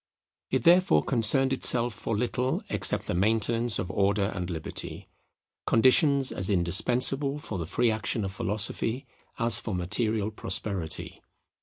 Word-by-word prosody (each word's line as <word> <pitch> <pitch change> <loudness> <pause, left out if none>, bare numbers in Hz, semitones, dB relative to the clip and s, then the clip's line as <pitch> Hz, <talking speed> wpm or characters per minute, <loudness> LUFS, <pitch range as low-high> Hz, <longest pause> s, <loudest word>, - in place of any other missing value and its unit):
It 130 -2 -1
therefore 180 +2 +4
concerned 130 +2 +2
itself 120 -2 +1
for 110 - -4
little 125 +3 -2
except - - 0
the - - -3
maintenance 110 +4 0
of 95 -3 -4
Order 100 +1 0
and 90 -2 -5
Liberty; 80 -3 -6 0.6
conditions 135 +3 +4
as 95 +2 -1
indispensable 125 +10 +2
for 110 -9 -6
the 80 - -4
free 120 +5 +1
action 110 0 -2
of 95 - -4
philosophy 110 +5 -1 0.3
as 115 -2 +2
for 105 - -4
material 105 +4 -1
prosperity. 95 -6 -4
110 Hz, 135 wpm, -27 LUFS, 95-125 Hz, 0.6 s, therefore